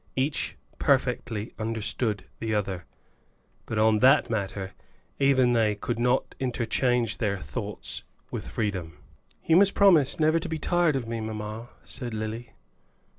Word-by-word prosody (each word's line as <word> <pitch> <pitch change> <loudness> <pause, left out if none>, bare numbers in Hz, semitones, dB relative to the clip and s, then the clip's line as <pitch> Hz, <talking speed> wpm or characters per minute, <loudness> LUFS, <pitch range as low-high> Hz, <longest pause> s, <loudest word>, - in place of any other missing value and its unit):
Each 135 +3 0 0.2
perfectly 125 -5 0
understood 110 -1 -1
the 110 -1 -1
other, 95 -4 -2 0.8
but 110 - -3
on 110 0 +4
that 135 +1 +5
matter 100 -3 -3 0.5
even 130 -3 +4
they 110 -3 +2
could 115 +3 -3
not 125 +2 +1
interchange 120 -2 0
their 105 -4 0
thoughts 70 -6 -6 0.3
with - - -5
freedom. 95 -7 -3 0.5
"You 165 - +5
must 195 +1 +5
promise 170 -10 +5
never 155 +1 +4
to 165 - -5
be 160 - -2
tired 170 -1 +2
of 125 -4 -2
me, 115 0 -3
mamma," 110 +1 -5
said 120 -3 -5
Lily. 110 +2 -5
115 Hz, 135 wpm, -27 LUFS, 105-135 Hz, 0.8 s, that